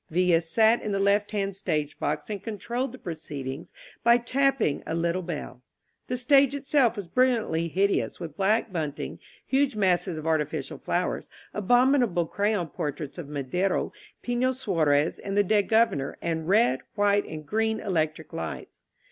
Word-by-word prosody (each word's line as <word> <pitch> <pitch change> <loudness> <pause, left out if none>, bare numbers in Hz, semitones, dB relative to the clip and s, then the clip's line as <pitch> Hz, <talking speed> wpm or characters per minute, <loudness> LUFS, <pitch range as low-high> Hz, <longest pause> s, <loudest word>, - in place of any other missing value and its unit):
Villa 175 0 +3
sat 220 +7 +3
in 210 - -3
the 195 - 0
left 200 +1 +2
hand 200 -2 -2
stage 150 -6 -2
box - - -2
and 205 -3 -4
controlled 235 +4 -3
the 255 - -10
pro 175 -9 -5
ceedings 145 -2 -7 0.3
by 235 +1 +6
tapping 265 - +1
a - - -2
little 170 +2 0
bell. 155 -7 -6 0.5
The 250 - -2
stage 275 +2 +4
itself 275 -4 +2
was 200 -5 -6
brilliantly 225 -7 +1
hideous 195 +4 0
with 165 -4 -7
black 205 +2 +1
bunting, 150 -4 -4 0.3
huge 270 -2 +1
masses 185 -3 +1
of 155 - -6
artificial 160 -2 -1
flowers, - - -2 0.2
abominable 245 -4 +3
crayon 200 -1 -1
portraits 145 +2 -5
of 150 -4 -7
Madero, 150 +7 -1 0.3
Pifio 245 +1 +1
Suarez 160 - +1
and 200 0 -4
the 205 - +5
dead 205 +1 +2
Governor, 220 -12 +2
and 160 -1 -3
red, 200 - +4 0.2
white 205 0 +3
and 155 -1 -8
grmi 220 +2 0
electric 160 -4 -1
lights. 80 - -6
195 Hz, 155 wpm, -26 LUFS, 160-230 Hz, 0.5 s, by